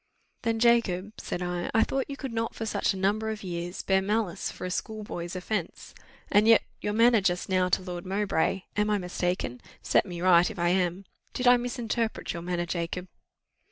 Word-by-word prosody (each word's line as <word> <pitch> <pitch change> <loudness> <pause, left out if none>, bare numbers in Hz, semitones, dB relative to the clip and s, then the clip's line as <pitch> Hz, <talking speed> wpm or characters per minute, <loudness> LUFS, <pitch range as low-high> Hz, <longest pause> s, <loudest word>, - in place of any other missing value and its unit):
"Then, 230 -1 0
Jacob," 220 -4 +2
said 180 - -4
I, 175 0 -2
"I 225 - +6
thought 270 +1 -2
you 275 - -5
could 270 -5 -5
not 230 0 -2
for 225 - -4
such 215 - +1
a 195 - -4
number 205 +3 +1
of 215 -1 -5
years 175 0 -4
bear 190 0 +3
malice 205 -2 -1
for - - -7
a 180 - -3
schoolboy's 190 -4 -4
offence; 185 -1 -4 0.4
and 210 +2 +5
yet 225 -1 +7 0.2
your 210 - -1
manner 230 0 +5
just 180 -1 0
now 185 -1 +2
to 185 - +1
Lord 175 -1 -5
Mowbray 195 -1 0
am 210 +1 +1
I 210 - +3
mistaken? 180 -8 -2 0.2
set - - +3
me 175 -2 -6
right, 175 -1 +5
if 220 - -8
I 175 0 +2
am 180 +1 0 0.3
did 250 - -2
I 245 0 +8
misinterpret 240 -2 -2
your 170 - -5
manner, 175 0 -2
Jacob?" 175 +1 -3
190 Hz, 195 wpm, -28 LUFS, 180-220 Hz, 0.4 s, I